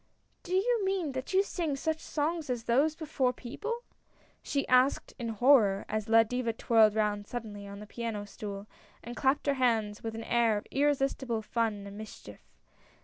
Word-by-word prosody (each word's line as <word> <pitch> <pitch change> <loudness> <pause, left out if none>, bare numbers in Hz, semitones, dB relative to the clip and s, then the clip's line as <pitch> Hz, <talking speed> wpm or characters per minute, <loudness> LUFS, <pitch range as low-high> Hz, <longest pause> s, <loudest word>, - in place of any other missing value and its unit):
" - - -42
Do 365 0 -3
you 455 +3 +2
mean 380 -6 0
that 260 0 -5
you 385 +1 +4
sing 335 -7 -2
such 315 +3 -2
songs 315 0 -2
as 245 -2 -2
those 280 +7 +2
before 295 -5 0
people?" 445 - -5 0.6
she 280 -1 -2
asked 255 +2 +3
in 235 -1 -3
horror, 225 -4 +4
as 215 0 -3
La 225 0 +7
Diva 235 0 -2
twirled 220 -2 +4
round 210 -1 0
suddenly 210 -4 -6
on 200 0 -8
the 210 - -8
piano 220 -2 -4
stool, 200 -1 -7 0.4
and 240 +1 -7
clapped 275 +2 +1
her 285 - +3
hands 220 -4 +1
with 225 -1 -5
an 225 - -5
air 230 -2 +2
of 205 - -6
irresistible 270 -5 0
fun 215 -3 -1
and 200 +1 -9
mischief. 220 - -10
240 Hz, 180 wpm, -30 LUFS, 215-290 Hz, 0.6 s, La